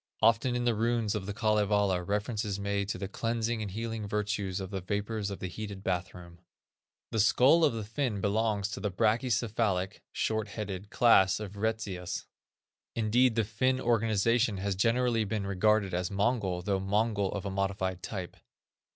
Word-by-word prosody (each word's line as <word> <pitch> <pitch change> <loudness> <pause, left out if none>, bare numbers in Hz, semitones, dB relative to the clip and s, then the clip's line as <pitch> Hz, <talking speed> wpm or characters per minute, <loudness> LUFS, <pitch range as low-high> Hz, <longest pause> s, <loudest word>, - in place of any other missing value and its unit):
Often 115 +2 +4
in 120 0 -1
the 120 - +3
runes 115 -1 0
of 100 -3 -4
The 105 - -3
Kalevala 105 -4 +2
reference 105 +4 -2
is 100 -2 -3
made 100 0 -1
to - - -2
the 95 +1 -4
"cleansing 115 +2 -2
and 105 - -3
healing 110 +1 -4
virtues 105 -2 -2
of 95 0 -6
the 95 -1 -3
vapors 105 +2 -2
of 100 - -5
the 95 - -4
heated 100 +1 -7
bathroom." 90 -2 -4 0.7
The 110 - -1
skull 130 +10 +5
of 150 - +4
the 110 -1 -3
Finn 115 0 -2
belongs 105 0 0
to 95 - -5
the 105 - -1
brachycephalic 110 -2 0
(short 110 -1 -1
headed) 100 -2 -6
class 95 -7 +5
of 105 -3 -6
Retzius. 100 -4 -3 0.7
Indeed 115 +2 +3
the 115 - +2
Finn 130 +5 0
organization 115 -1 +2
has 100 +1 -1
generally 115 +2 +2
been 105 -1 -2
regarded 100 0 +2
as 90 0 -1
Mongol, 100 -3 0
though 95 0 0
Mongol 100 0 0
of 100 0 -4
a 100 - -2
modified 95 -1 -2
type. 95 -2 -6
105 Hz, 170 wpm, -30 LUFS, 95-115 Hz, 0.7 s, skull